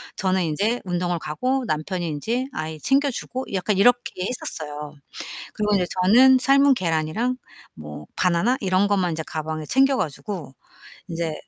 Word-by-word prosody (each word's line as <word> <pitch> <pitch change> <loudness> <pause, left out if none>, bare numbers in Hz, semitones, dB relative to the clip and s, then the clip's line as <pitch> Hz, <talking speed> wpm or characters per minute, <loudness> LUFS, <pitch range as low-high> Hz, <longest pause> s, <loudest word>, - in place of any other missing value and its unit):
저는 190 -1 +1
인제 205 +10 0
운동을 175 -1 -1
가고 255 - -1
남편이 175 +2 -2
인제 225 - -2
아이 155 0 -5
챙겨주고 270 - 0
약간 195 +1 0
이렇게 240 -3 +2
했었어요. 150 -10 -5 0.6
그리고 210 -1 +1
이제 185 -2 +2 0.2
저는 250 +8 +7
삶은 275 +2 +5
계란이랑 175 +6 0 0.4
뭐 75 -1 -9
바나나 185 +8 +2
이런 190 0 +2
것만 190 -4 +1
인제 160 0 -3
가방에 155 0 -4
챙겨 270 - +3
가지고 155 - -4 0.5
인제 165 -2 -3
185 Hz, 325 characters per minute, -23 LUFS, 160-245 Hz, 0.6 s, 저는